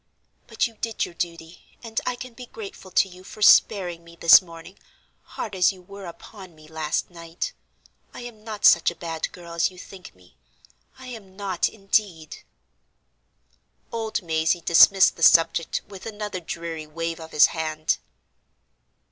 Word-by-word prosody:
But - - 0
you 230 -3 -7
did 225 0 -2
your - - -11
duty, 170 0 -7
and 225 -1 -3
I 250 - 0
can 250 0 -9
be 250 +1 -11
grateful 200 -4 -10
to 185 - +3
you 185 0 -14
for 210 +2 -7
sparing 180 -5 +4
me 170 0 -15
this 170 0 +8
morning, 170 +1 -13 0.6
hard 210 - -4
as 185 0 +3
you 185 -2 -15
were 200 0 -10
upon 185 +1 -12
me 155 0 -17
last 155 +1 -3
night. 170 0 -6 0.6
I - - -10
am 235 -3 -10
not 215 -2 -4
such 170 - +6
a 170 - -9
bad 165 -1 -4
girl 170 -1 -11
as 170 0 +1
you 185 - -17
think 185 - -12
me—I 70 - -22
am 220 -7 -10
not, 195 -4 -1
indeed." 195 -6 -2 1.5
Old 225 -2 -3
Mazey 160 +1 0
dismissed 185 +3 +6
the - - -11
subject 165 0 +4
with 195 +1 -10
another 210 -3 -5
dreary 165 -2 -6
wave 165 +2 -4
of 160 0 -10
his 150 - +7
hand. 155 -1 -1
175 Hz, 160 wpm, -24 LUFS, 165-205 Hz, 1.5 s, this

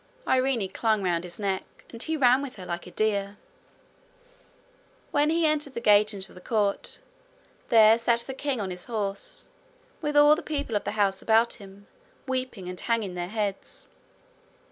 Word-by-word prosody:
Irene 255 -5 +2
clung 215 +1 0
round 175 -2 0
his 175 -1 -7
neck 195 -2 -1 0.3
and 230 - -8
he 320 +3 -1
ran 255 -1 +5
with 275 -2 -6
her 185 -3 -9
like 175 0 -5
a - - -8
deer. 200 0 -1 1.7
When 295 +1 +3
he 330 +1 +2
entered 300 -3 0
the - - -2
gate 210 -2 +5
into 195 -2 -2
the 180 - -13
court, 205 -1 -1 0.7
there 225 0 +7
sat 235 0 +2
the 265 - -6
king 270 -2 -2
on 195 -3 -3
his 180 -1 -6
horse, 200 -4 -4 0.5
with 295 -2 0
all 295 +1 +7
the - - -5
people 285 -7 -3
of 205 - -1
the - - -2
house 195 -2 +1
about 225 +1 +3
him, 200 +1 -13 0.4
weeping 255 -7 -3
and 180 0 -5
hanging 225 -5 -1
their 175 0 -4
heads. 205 -2 -4
220 Hz, 170 wpm, -27 LUFS, 195-260 Hz, 1.7 s, there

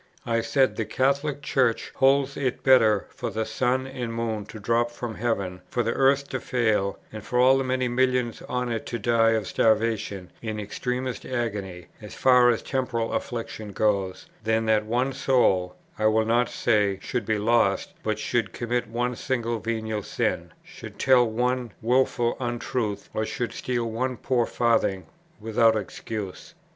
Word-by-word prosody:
I 115 -2 +1
said, 130 +2 +1
"The - - -1
Catholic 140 +2 0
Church 125 -5 +1
holds 135 +1 +3
it 130 -3 -2
better 110 -6 +5
for 120 - -4
the 110 0 -2
sun 125 +4 0
and 125 -3 -5
moon 115 -2 -3
to 110 - -9
drop 115 +3 +1
from 120 -1 -6
heaven, 100 -6 -2
for 120 - 0
the 115 +1 0
earth 140 +1 +3
to 130 - -2
fail, 110 -6 0 0.2
and 110 -1 -7
for 125 - -2
all 130 +2 +6
the - - 0
many 130 0 0
millions 125 -1 0
on 125 -1 -1
it 115 - -3
to 120 - -3
die 115 0 +3
of 110 -2 0
starvation 110 -3 0
in 110 -2 -4
extremest 125 +4 -3
agony, 100 -8 -4 0.2
as 105 - -9
far 125 -2 +5
as 115 - +1
temporal 120 -4 -2
affliction 110 -3 -4
goes, 100 -2 0 0.2
than 110 +1 +1
that 110 -1 +2
one 125 +4 0
soul, 110 -10 +2 0.2
I 110 - +3
will 110 0 +3
not 120 +2 +2
say, 105 -4 +1
should 120 -1 -3
be 110 -1 +1
lost, 110 -2 +2
but 110 -1 -1
should 110 -2 -1
commit 120 0 -2
one 120 +2 -2
single 120 -2 -2
venial 110 -1 -2
sin, - - -2
should - - -11
tell 125 -3 +4
one 125 +1 -1
wilful 120 0 +1
untruth, 120 -3 -3
or 110 - -1
should 120 +2 -3
steal 120 -2 -2
one 125 +3 -2
poor 120 -3 0
farthing 115 -5 +1 0.3
without 110 +1 +3
excuse." 105 0 -6
115 Hz, 165 wpm, -25 LUFS, 110-125 Hz, 0.3 s, all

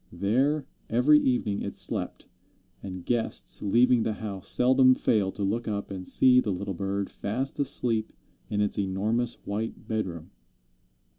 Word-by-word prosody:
There 130 - 0 0.2
every 135 +6 +5
evening 120 -7 0
it - - -5
slept, - - -2 0.5
and 95 -2 -7
guests 120 -2 0
leaving 120 +4 +3
the 110 - -1
house 100 -3 -6
seldom 130 +1 +5
failed 100 -7 0
to 100 - -3
look 110 +5 -1
up 100 -2 -3
and 95 -1 -6
see 125 -1 +5
the 110 - -1
little 100 +1 -3
bird 100 +2 -2
fast 130 +7 -4
asleep 115 -5 0 0.4
in 105 -1 0
its 105 0 0
enormous 105 +5 -1
white 110 +3 -4
bedroom. 90 -7 -4
110 Hz, 145 wpm, -27 LUFS, 100-125 Hz, 0.5 s, every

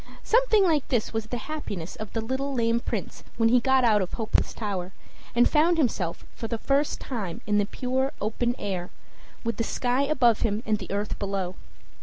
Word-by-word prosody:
Something 455 -3 +4
like 315 -6 +2
this 240 -5 0
was 225 -1 -2
the 245 - -3
happiness 215 - -5
of 215 -1 -7
the 225 - -2
little 265 +4 -2
lame 230 -1 +2
Prince - - -4
when 225 -1 +4
he 250 +1 +6
got 265 +1 +3
out 215 -3 +4
of 185 - -3
Hopeless 220 -2 0
Tower, 195 -4 -4 0.4
and 240 +1 +6
found 330 +3 +3
himself 205 - 0
for 225 - -4
the 230 - -2
first 280 +5 +1
time 210 -10 -4
in 210 0 +2
the 205 - +1
pure 260 +3 -1
open 235 +3 0
air, 185 -3 -3 0.5
with 230 0 -2
the 230 - +1
sky 245 +3 0
above 260 -6 +3
him 215 +1 0
and 215 -1 +1
the 190 - -8
earth 205 +1 -2
below. 195 -2 -2
230 Hz, 195 wpm, -26 LUFS, 205-265 Hz, 0.5 s, he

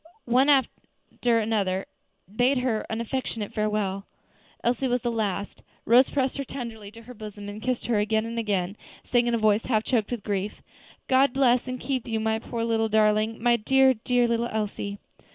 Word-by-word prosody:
One 255 +4 +3
after 255 -3 0
another 205 -4 0 0.5
bade 255 +4 +3
her 250 -4 -1
an 225 +1 -2
affectionate 235 -3 -3
farewell. 210 -2 -1 0.6
Elsie 250 +3 +1
was 245 0 0
the 240 - 0
last. 205 -3 -3 0.2
Rose 245 +3 +5
pressed 270 -1 -1
her - - -1
tenderly 230 -6 -7
to 230 0 -12
her 250 +2 -11
bosom, 210 -2 -9
and 205 +1 -7
kissed 255 0 -2
her 230 -3 +1
again 220 +1 +1
and 230 0 -4
again, 200 -3 -1 0.3
saying, 240 -1 +1
in 240 - +2
a - - +1
voice 215 0 +2
half 220 -4 +1
choked 225 -5 0
with 240 -5 -4
grief, 200 0 -3 0.4
"God 265 0 +4
bless 255 -2 +3
and 255 0 -4
keep 260 -3 -3
you, 225 -1 -1
my 220 0 0
poor 230 0 -4
little 225 -1 +1
darling; 215 +1 +2
my 240 -1 +4
dear, 265 +4 +4
dear 245 +1 +1
little 235 0 0
Elsie!" 205 -2 -3
230 Hz, 185 wpm, -26 LUFS, 215-250 Hz, 0.6 s, Rose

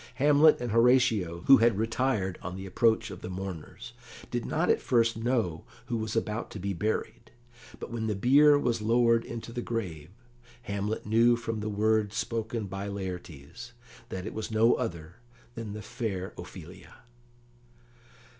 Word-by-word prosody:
Hamlet 145 +3 +5
and 120 -2 -3
Horatio, 115 -7 +3
who 135 - +9
had 115 -3 +3
retired 110 -4 -1
on 90 0 -6
the 95 0 -7
approach 110 +3 +1
of - - -9
the - - -6
mourners, 95 -3 -7 0.4
did - - -2
not - - 0
at - - +2
first 115 -2 +2
know 115 -8 -1 0.2
who 120 - -2
was 110 0 -4
about 115 0 -2
to - - -8
be 100 +2 -2
buried, 105 +5 -3 0.5
but - - -7
when 115 -1 -3
the 105 - -1
bier 145 +8 +5
was 120 -5 0
lowered 115 +1 +3
into 115 0 -7
the 120 - -3
grave, 90 -11 -4 0.5
Hamlet 100 0 -3
knew 115 +3 +4
from 115 -1 -4
the 105 0 -3
words 105 0 +1
spoken 115 -1 -2
by 95 +1 -5
Laertes 95 - -7 0.4
that 95 0 -5
it 110 - -5
was 110 - -4
no 110 +2 +4
other 85 -6 -4 0.4
than 115 -3 -6
the 105 0 -7
fair 100 -5 -4
Ophelia. 90 0 -11
110 Hz, 160 wpm, -28 LUFS, 95-115 Hz, 0.5 s, who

